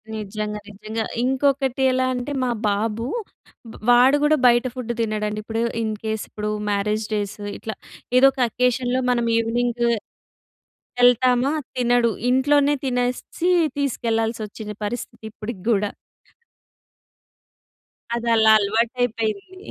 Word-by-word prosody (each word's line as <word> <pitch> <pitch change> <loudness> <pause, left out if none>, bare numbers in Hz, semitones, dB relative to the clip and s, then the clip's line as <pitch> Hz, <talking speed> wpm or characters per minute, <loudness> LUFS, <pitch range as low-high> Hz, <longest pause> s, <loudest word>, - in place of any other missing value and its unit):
నిజంగా. 210 0 -4
నిజంగా. 215 +2 -5 0.2
ఇంకొకటి 265 0 +1
ఎలా 255 0 +1
అంటే, 250 +3 -4
మా 250 - 0 0.2
బాబు 215 +3 -1 0.7
వా - - -11 0.3
వాడు 270 +3 +5
గూడా 305 +1 +4
బయట 240 +1 +4
ఫుడ్ 245 -2 -4
తినడండి. 215 -1 -2
ఇప్పుడు 225 +1 -3 0.2
ఇన్‌కేస్ 220 0 -3
ఇప్పుడు, 210 0 -4 0.2
మ్యారేజ్ 210 +1 0
డేస్, 205 -1 -2 0.2
ఇట్లా 220 -2 -6 0.4
ఏదో 260 - +7
ఒక 265 - -12
అకేషన్‌లో 250 +1 0
మనం 240 -1 +1
ఈవినింగు 235 +1 0 1.2
ఎళ్తామా, 250 +2 +4 0.3
తినడు. 245 -1 +3 0.2
ఇంట్లోనే 285 +2 +3
తినేసి 250 +7 -1 0.3
తీసుకెళ్ళాల్సొచ్చిన 225 -5 -2
పరిస్థితి 225 0 -6
ఇప్పుడీ 220 +2 -6
గూడా. 205 -2 +2 2.3
అదలా 230 -2 +4
అలవాటైపోయింది. 225 - -1
235 Hz, 105 wpm, -22 LUFS, 215-250 Hz, 2.3 s, ఏదో